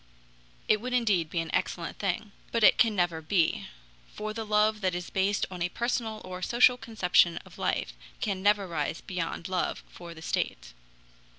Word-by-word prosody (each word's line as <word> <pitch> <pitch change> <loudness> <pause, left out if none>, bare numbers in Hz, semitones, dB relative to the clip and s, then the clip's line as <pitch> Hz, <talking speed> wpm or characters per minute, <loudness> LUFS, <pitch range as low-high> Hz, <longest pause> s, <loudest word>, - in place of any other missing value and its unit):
It 215 -1 +3
would 250 +1 -4
indeed 205 -10 +2
be 170 - -1
an 165 - -6
excellent 170 -1 -2
thing. 200 +1 -2 0.2
But 230 -1 +1
it - - +7
can 225 -3 +4
never 175 -3 0
be, 165 +1 +1 0.4
for 215 0 -5
the 225 0 -4
love 210 0 +3
that 185 -2 0
is 180 0 -5
based 195 +2 +1
on 180 -2 -7
a 175 - +1
personal 230 -1 -2
or 185 0 -7
social 245 +4 +5
conception 185 -8 +2
of - - -15
life - - -1 0.3
can 195 -2 -2
never 205 0 +3
rise 160 -1 -2
beyond 170 -2 -4
love 185 -1 -2
for 170 -1 -10
the 160 - -11
state. - - -2
190 Hz, 180 wpm, -28 LUFS, 175-215 Hz, 0.4 s, it